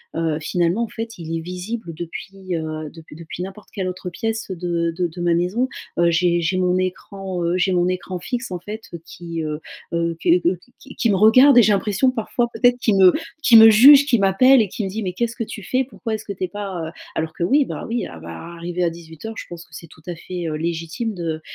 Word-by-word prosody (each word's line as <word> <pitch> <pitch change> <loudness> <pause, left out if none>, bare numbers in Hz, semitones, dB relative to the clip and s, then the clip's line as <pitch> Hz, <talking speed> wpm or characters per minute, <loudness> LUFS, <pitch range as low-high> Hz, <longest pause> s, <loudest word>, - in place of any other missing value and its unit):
heu. 160 -2 0
Finalement, 175 +6 0
en 230 - -3
fait, 230 +1 -6
il 165 -1 -5
est - - -3
visible 180 +3 -6
depuis, 185 +3 -6
heu, 155 -1 -4
depuis 160 -1 -14
depuis 165 +2 -7
n'importe 195 +2 -10
quelle 190 -2 -3
autre 180 0 -5
pièce 225 +3 -4
de 170 -2 -1
de 175 +1 -1
de 175 +1 -9
ma 175 -1 +2
maison. 185 +10 0 0.3
Heu, 170 0 +4
j'ai 175 0 +2
j'ai 170 +3 0
mon 180 0 +2
écran, 185 0 -4
heu 170 +2 +1
j'ai 185 +1 +1
mon 180 -1 +2
écran 185 0 -3
fixe 245 +3 -4
en 180 - -3
fait, 210 +5 -7
heu, 170 - -7
qui, 170 -1 -6
heu, 150 -1 -3 0.3
heu 170 -1 -1
que 175 - +4
que 175 - +2 0.3
qui 270 - -13
qui 235 - +1
me 200 - +3
regarde 245 +7 +6
et 240 - +9
j'ai 215 - +4
l'impression 210 +6 +1
parfois 240 0 -1
peut-être 245 +2 +3
qui 225 - +2
me 190 -2 +6 0.3
qui 240 - +5
me 225 0 +11
juge, 270 +6 +8
qui 245 -6 +2
m'appelle 230 +7 +5
et 215 - 0
qui 210 +4 -5
me 195 - -2
dit: 215 +4 -4
«Mais 185 -2 -3
qu'est-ce 235 +4 -2
que - - -3
tu 210 - -8
fais? 255 +6 0
Pourquoi 230 -2 -5
est-ce 215 - -8
que 200 - -5
tu 190 - -6
es - - 0
pas, 190 -4 -5
heu», - - -7 0.2
alors 160 0 -2
que 170 - -4
oui, 280 +11 +4
bah, - - -6
oui, 235 +1 -2
ah 85 - -11
bah, 80 +1 -10 0.3
arrivée 175 +1 -3
à 170 - +2
18:00 165 +6 -9
je - - -6
pense 170 -1 -8
que - - -26
c'est 165 - -10
tout 160 - -18
à 175 - -4
fait, 175 +1 -6
heu, 155 - -2
légitime 165 +7 -3
de, 165 -4 -4
180 Hz, 250 wpm, -21 LUFS, 170-220 Hz, 0.3 s, me